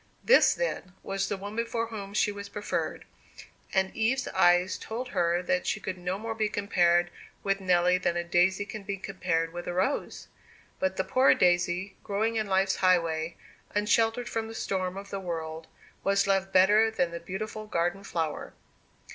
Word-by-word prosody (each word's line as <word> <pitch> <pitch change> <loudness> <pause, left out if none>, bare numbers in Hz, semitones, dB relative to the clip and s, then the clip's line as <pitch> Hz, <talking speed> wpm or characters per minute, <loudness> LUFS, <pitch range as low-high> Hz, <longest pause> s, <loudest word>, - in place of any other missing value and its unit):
This, - - +6
then, 345 - -3
was 195 0 -2
the 200 - -2
woman 205 +3 -7
before 230 0 -2
whom 205 -3 -7
she 210 - +2
was 200 0 -8
preferred; 210 - -3 0.7
and 190 0 0
Eve's 250 +4 +1
eyes 180 0 +3
told 245 +3 -5
her 175 -3 +1
that 270 +4 0
she 215 - 0
could 185 -2 -5
no 180 +1 -2
more 225 +2 -4
be 215 -1 0
compared 175 -4 +2 0.3
with 195 0 0
Nelly 180 -1 +3
than 175 -1 0
a 175 - -1
daisy 180 +3 +2
can 215 +1 -7
be 200 0 -4
compared 175 -4 -2
with 175 0 -6
a 175 - -2
rose! 190 +11 -1 0.5
But 190 0 -1
the 190 - +1
poor 255 +8 +4
daisy, 175 +2 +1
growing 220 +3 -1
in 215 -2 0
life's 190 0 +2
highway, 170 -3 +1 0.4
unsheltered 225 +3 +2
from 225 -1 -3
the 225 - -8
storms 185 -3 -2
of 200 0 -8
the 195 - -3
world, 160 -3 -5 0.4
was 200 0 +2
loved 195 -1 +1
better 205 +4 +5
than 180 -6 0
the 170 - -5
beautiful 215 +5 -6
garden 175 +1 -1
flower. 160 -5 -3
195 Hz, 175 wpm, -28 LUFS, 175-215 Hz, 0.7 s, This